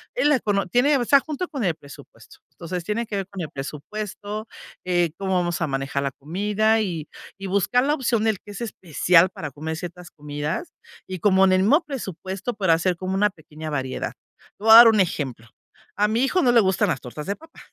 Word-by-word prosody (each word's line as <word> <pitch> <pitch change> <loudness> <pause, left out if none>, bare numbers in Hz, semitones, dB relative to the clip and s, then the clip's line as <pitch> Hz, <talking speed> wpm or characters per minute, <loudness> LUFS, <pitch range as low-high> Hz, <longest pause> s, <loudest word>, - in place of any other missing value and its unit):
en - - +3
la 295 - +5
econo 200 -6 0
tiene, 260 +9 +3
o 245 - -1
sea, 280 +2 +5
junto 315 +4 -4
con 275 -8 -4
el 175 -3 +2
presupuesto. 140 -2 -15
Entonces 175 0 -6
tiene 215 +4 -2
que 210 - -4
ver 195 -1 -3
con 195 -2 -7
el 155 - -4
presupuesto, 205 +9 -6 0.4
eh, 175 -2 +2
cómo 190 -1 -2
vamos 175 -2 0
a - - +2
manejar 135 +1 -2
la 140 - -1
comida, 210 +9 0
y 165 -7 -3 0.3
y 195 - -5
buscar 200 +6 +2
la 295 +2 +2
opción 235 -5 0
del 220 -3 +2
que 205 - -12
es 200 - -8
especial 180 -4 +3
para 155 -4 -6
comer 155 +4 -5
ciertas 175 +1 -8
comidas, 150 - -5 0.4
y 185 -1 -5
como 190 0 +4
en 185 - +4
el 185 - +4
mismo 295 - +4
presupuesto 200 - -5
para 190 -6 +2
hacer 175 +2 0
como 185 +2 -3
una 205 +1 +2
pequeña 155 -1 -9
variedad. 130 -3 -3 0.5
Te - - -13
voy 225 - +3
a - - +12
dar 235 0 +11
un 220 -2 +4
ejemplo. 135 -10 -1 0.5
A 210 - +2
mi 225 +4 +1
hijo 365 +7 +2
no 245 - +4
le 235 - +6
gustan 190 +1 +1
las 135 - -1
tortas 150 +5 -8
de 200 - -1
papa. 320 +5 -17
190 Hz, 220 wpm, -23 LUFS, 165-220 Hz, 0.5 s, a